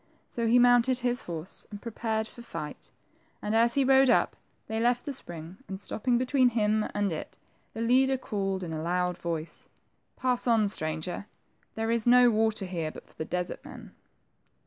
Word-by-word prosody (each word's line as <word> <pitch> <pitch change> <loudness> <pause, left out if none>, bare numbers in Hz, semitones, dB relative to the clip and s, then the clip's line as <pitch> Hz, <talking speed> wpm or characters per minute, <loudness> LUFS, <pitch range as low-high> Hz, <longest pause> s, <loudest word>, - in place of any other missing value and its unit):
So 235 -1 -2
he 235 +2 +5
mounted 245 +1 +5
his 245 -1 0
horse 170 +1 -5
and 205 - -8
prepared 220 -1 -2
for 240 - -12
fight, 235 - -7 0.5
and 210 - -3
as 235 +1 +4
he 280 - +4
rode 265 0 +6
up, - - +3 0.3
they 220 0 -3
left 245 +1 +2
the 285 - -3
spring, 170 -6 -7
and 190 -1 -6
stopping 240 +4 0
between 255 0 +3
him 215 -2 +1
and 205 -2 +1
it, 155 - -7 0.4
the 225 - -4
leader 260 +3 +3
called 195 -6 -2
in 165 -2 -5
a 155 - -3
loud 180 +1 0
voice, 165 -1 -5 0.5
Pass 250 -1 0
on,, 225 -3 +4
stranger. 160 +2 -3 0.5
There 225 +1 -1
is 235 0 0
no 245 0 +7
water 220 -2 +1
here 170 -4 -3
but - - -11
for - - -20
the 160 - -5
desert 180 +1 -3
men." - - -11
220 Hz, 180 wpm, -28 LUFS, 180-245 Hz, 0.5 s, no